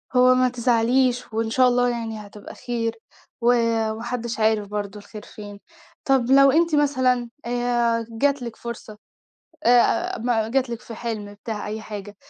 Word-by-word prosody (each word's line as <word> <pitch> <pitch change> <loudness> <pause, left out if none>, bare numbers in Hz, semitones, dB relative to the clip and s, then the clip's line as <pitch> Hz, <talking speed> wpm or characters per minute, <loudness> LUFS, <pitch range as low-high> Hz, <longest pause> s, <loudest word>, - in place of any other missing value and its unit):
هو 255 0 +6
ما 255 0 +3
تزعليش 245 0 +1
وإن 225 0 -1
شاء 255 +2 +4
الله 245 0 +2
يعني 225 -3 -5
هتبقى 205 0 -12
خير 230 -2 -3 0.5
و 235 - 0 0.4
وما 220 +1 -6
حدِّش 235 -2 -4
عارف 215 -1 +2
برضه 205 0 -5
الخير 210 +1 -11
فين. 205 -1 -11 0.5
طَب 265 -2 +2
لو 275 0 +7
أنتِ 330 +2 +2
مثلًا 255 -4 +1 0.2
آآ، 240 -1 0
جات 275 +4 0
لِك 235 -2 -6
فرصة 225 -2 -8 0.7
آآ، 240 0 +3
ما 225 -2 0
جَات 260 0 0
لِك 235 -1 -5
في 230 - -10
حِلم، 215 -3 -5
بتاع 210 +1 -6
أي 215 +1 -5
حاجة، 205 -1 -8
235 Hz, 160 wpm, -23 LUFS, 220-250 Hz, 0.7 s, لو